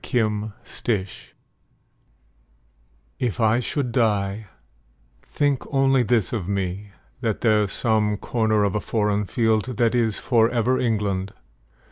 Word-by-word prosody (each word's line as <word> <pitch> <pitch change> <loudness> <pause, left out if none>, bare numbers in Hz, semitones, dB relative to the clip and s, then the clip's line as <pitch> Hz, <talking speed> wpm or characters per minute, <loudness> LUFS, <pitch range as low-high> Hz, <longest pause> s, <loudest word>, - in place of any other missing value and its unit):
The 110 -2 -1
Soldier 100 -5 -2 2.1
If 120 -4 -2
I 110 +1 +3
should 125 +1 -2
die, 105 -3 0 0.7
think 145 -3 -1
only 135 -1 +3
this 120 -3 +1
of 100 -7 -3
me: 100 0 -3 0.3
That 115 -4 -2
there's 105 -3 +2
some 110 -3 +1
corner 110 -2 +1
of 100 - 0
a 105 - -1
foreign 105 -1 0
field 110 +3 0
That 115 -1 +2
is 115 -3 +1
for 115 -2 +2
ever 125 +1 +1
England. 100 -4 -1
110 Hz, 120 wpm, -23 LUFS, 105-120 Hz, 2.1 s, I